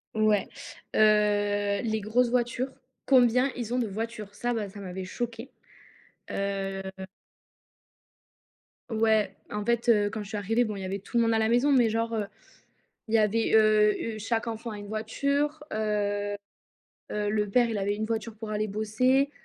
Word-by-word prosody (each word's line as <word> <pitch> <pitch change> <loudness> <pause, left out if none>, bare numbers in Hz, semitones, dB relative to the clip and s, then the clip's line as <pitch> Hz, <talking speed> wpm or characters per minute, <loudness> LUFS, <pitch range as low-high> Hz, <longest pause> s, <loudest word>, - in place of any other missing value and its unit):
Ouais, 215 -2 +3 0.5
heu, 205 -1 +3
les 220 -1 0
grosses 235 +4 +2
voitures, 245 +2 0 0.3
combien 250 0 +4
ils 240 -1 -4
ont 250 - +1
de 235 - 0
voitures, 215 0 -5
ça, 240 +3 -2
bah, 215 -3 -3
ça 200 - -11
m'avait 190 -1 -6
choquée, 235 +5 -5 0.8
heu 195 -1 -2 2.1
Ouais, 220 -3 +2 0.2
en 210 0 -3
fait, 235 +1 +1
heu, 205 -3 +4
quand 220 - -4
je 205 - -8
suis 215 - -3
arrivée, 225 +4 +1
bon, 215 -3 -3
il 195 - -6
y - - -4
avait 195 +2 -3
tout 200 +5 -4
le 235 - +5
monde 230 0 +2
à 225 - +2
la 220 0 +2
maison, 245 +5 +3
mais 245 -4 +5
genre, 230 +1 -1
heu, 215 -2 -1 0.8
il 220 - -5
y - - +6
avait, 220 +1 +2
heu, 215 0 +3
heu, - - -7
chaque 225 +2 -1
enfant 230 +1 -4
a 210 - -6
une 205 0 -8
voiture. 280 +8 -1
Heu, 205 -1 -1 0.8
heu, 210 0 -1
le 210 -1 0
père 240 +4 +4
il 220 - -2
avait 200 +1 0
une 215 +1 -2
voiture 225 0 -3
pour 220 0 -7
aller 215 0 -1
bosser, 255 +7 +1
220 Hz, 180 wpm, -27 LUFS, 205-235 Hz, 2.1 s, y